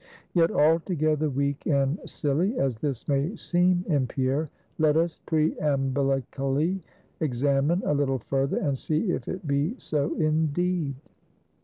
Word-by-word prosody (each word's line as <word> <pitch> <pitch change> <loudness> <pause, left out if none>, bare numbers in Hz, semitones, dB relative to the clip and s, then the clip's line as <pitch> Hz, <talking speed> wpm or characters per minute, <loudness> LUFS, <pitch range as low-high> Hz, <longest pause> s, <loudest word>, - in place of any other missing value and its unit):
Yet 170 -2 +4
altogether 155 -1 +2
weak 140 +1 -2
and 140 +2 +1
silly 165 - 0
as 130 -4 0
this 135 -4 -3
may 145 +8 0
seem 180 -1 +1
in 145 -7 +1
Pierre, 135 +4 -1 0.3
let 155 -1 +4
us 165 0 0
preambillically 140 +1 0 0.4
examine 140 +4 +1
a - - +2
little 140 -2 +1
further, 135 +3 -1
and 140 -2 0
see 155 - -1
if - - -3
it 185 -2 -5
be 145 - 0
so 150 - -1
indeed. 155 0 0
150 Hz, 130 wpm, -26 LUFS, 135-165 Hz, 0.4 s, Yet